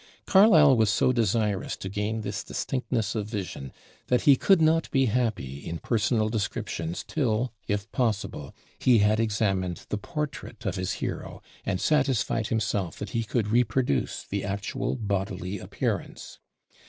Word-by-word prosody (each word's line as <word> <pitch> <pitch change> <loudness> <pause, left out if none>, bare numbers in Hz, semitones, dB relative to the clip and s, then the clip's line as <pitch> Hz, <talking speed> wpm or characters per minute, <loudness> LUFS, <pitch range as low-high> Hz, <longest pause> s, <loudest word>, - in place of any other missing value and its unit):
Carlyle 170 -9 +7
was 110 -3 +3
so 105 +5 +3
desirous 105 -3 0
to - - -6
gain 105 +3 -2
this 100 -2 -4
distinctness 120 -5 -2
of 105 -3 -2
vision 95 - -5 0.4
that 125 - +2
he 140 - +6
could 190 +7 +4
not 160 +1 +3
be 135 -1 +3
happy 110 - -1
in 85 - -4
personal 110 +2 +1
descriptions 95 -6 -3
till, 120 -4 0
if 105 0 -1
possible, 110 - -1 0.3
he 125 -2 +5
had 105 +1 +3
examined 100 -5 0
the 105 - -2
portrait 150 +2 -5
of - - 0
his 90 +1 -2
hero - - -5 0.3
and 90 - 0
satisfied 125 -7 +1
himself 105 -6 -1
that 105 -2 -6
he 115 - 0
could 110 -1 -1
reproduce 120 - +1
the 100 0 -3
actual 100 +1 -2
bodily 100 -3 -3
appearance. - - -4
110 Hz, 145 wpm, -27 LUFS, 100-125 Hz, 0.4 s, Carlyle